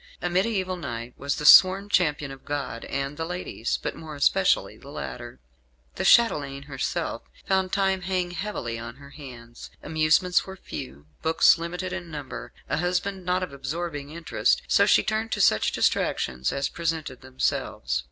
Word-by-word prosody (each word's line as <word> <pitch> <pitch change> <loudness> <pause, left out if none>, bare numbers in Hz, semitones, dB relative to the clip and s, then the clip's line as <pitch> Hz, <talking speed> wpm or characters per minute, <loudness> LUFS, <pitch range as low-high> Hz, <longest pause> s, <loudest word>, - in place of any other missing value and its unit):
A - - -2
mediæval 185 -1 0
knight 120 -5 -6
was 140 0 -2
the 150 - -5
sworn 190 +5 +8
champion 150 -7 +1
of 135 -1 -11
God 140 -5 -4
and 140 +1 -3
the 165 - -2
ladies 175 -9 -3
but - - -3
more 155 -2 -9
especially 140 - +2
the - - -14
latter. 65 - -7 0.5
The - - -4
chatelaine, 140 -12 +4
herself, 140 -2 -3 0.2
found 190 -1 +1
time 190 -1 +1
hang 180 -1 -1
heavily 175 - -4
on 115 +1 -8
her 140 +1 -14
hands. 120 -5 -11
Amusements 160 +4 +2
were 190 - -9
few; 70 - -8 0.2
books 160 +1 +5
limited 180 +2 -4
in 175 -2 -6
number; 150 -2 -7 0.2
a - - -1
husband 180 +2 -2
not 180 +1 +1
of 180 - -6
absorbing 145 +1 -4
interest; 165 +1 0
so - - +4
she - - +5
turned 220 +1 -2
to 205 - -2
such 110 - +3
distractions 65 -1 0
as 140 0 -1
presented 160 -6 -3
themselves. 130 - -2
160 Hz, 160 wpm, -25 LUFS, 135-185 Hz, 0.5 s, sworn